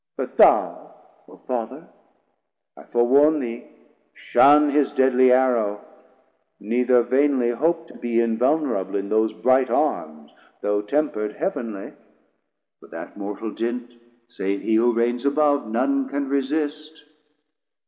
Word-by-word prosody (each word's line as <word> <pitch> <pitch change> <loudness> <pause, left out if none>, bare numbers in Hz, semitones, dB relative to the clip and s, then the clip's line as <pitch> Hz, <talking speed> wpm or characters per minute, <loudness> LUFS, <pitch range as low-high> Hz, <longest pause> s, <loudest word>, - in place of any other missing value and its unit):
But - - -5
thou - - +3 0.3
O - - -16
Father, 130 +5 -5 0.9
I - - -15
forewarn 140 +6 +3
thee, 120 -3 -6 0.5
shun 145 +2 +4
810 140 - -3
His 145 - 0
deadly 130 -1 +3
arrow; 120 -5 +2 0.8
neither 120 +3 +2
vainly 130 -1 +1
hope 165 +7 -1
To - - -14
be 120 -1 -1
invulnerable 115 -1 0
in 100 0 -3
those 110 0 +1
bright 130 0 +1
Arms, 75 - -2 0.3
Though 105 0 0
temper'd 105 -2 -2
heav'nly, 115 - -5 0.9
for - - -17
that - - -10
mortal 105 +2 -6
dint, 120 +2 -5 0.3
Save 100 -3 -4
he 110 - -1
who 115 +2 +3
reigns 120 +1 -1
above, 145 -1 +1
none 135 +4 0
can 140 0 -3
resist. 150 +3 -3
125 Hz, 125 wpm, -22 LUFS, 115-140 Hz, 0.9 s, shun